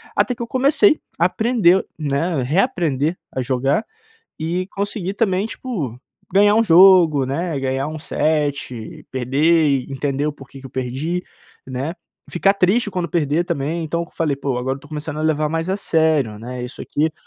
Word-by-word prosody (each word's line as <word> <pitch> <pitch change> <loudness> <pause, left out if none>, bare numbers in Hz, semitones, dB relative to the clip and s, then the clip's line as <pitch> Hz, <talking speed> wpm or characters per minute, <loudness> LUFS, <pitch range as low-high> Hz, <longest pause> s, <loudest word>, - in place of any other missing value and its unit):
Até 250 - +2
que 240 - -10
eu 235 - -3
comecei 285 - +3 0.2
a 170 - +4
aprender, 195 -2 +3
né, 150 +1 0
reaprender 160 - 0 0.2
a 130 - -1
jogar, 135 - 0 0.6
e 175 +3 -2
consegui 200 -1 -3
também 200 -2 +1
tipo 165 - -5 0.3
ganhar 205 +2 +5
um 225 - +4
jogo, 170 - +6
né, 155 +3 -2
ganhar 135 +1 -1
um 155 0 -6
set, 145 -7 -2
perder, 140 +2 +2
entender 140 +1 -1
o 150 - -1
porque 135 -1 -13
que 135 - -9
eu - - -13
perdi, 135 +9 -3 0.4
né, 135 +4 -3 0.4
ficar 195 +3 +3
triste 205 +4 +2
quando 180 -2 -2
perder 155 +1 +1
também, 165 0 -2
então 170 +2 -2
eu 170 - -9
falei: 150 -4 -1
"Pô 135 -2 -2
agora 130 +2 -2
eu 135 - -14
tô - - -15
começando 155 0 -5
a - - -2
levar 155 -1 +1
mais 165 +3 -2
a 190 - 0
sério, 160 - +1
né, 125 +2 -6
isso 125 +1 -8
aqui 155 +2 -1
155 Hz, 175 wpm, -20 LUFS, 135-180 Hz, 0.6 s, jogo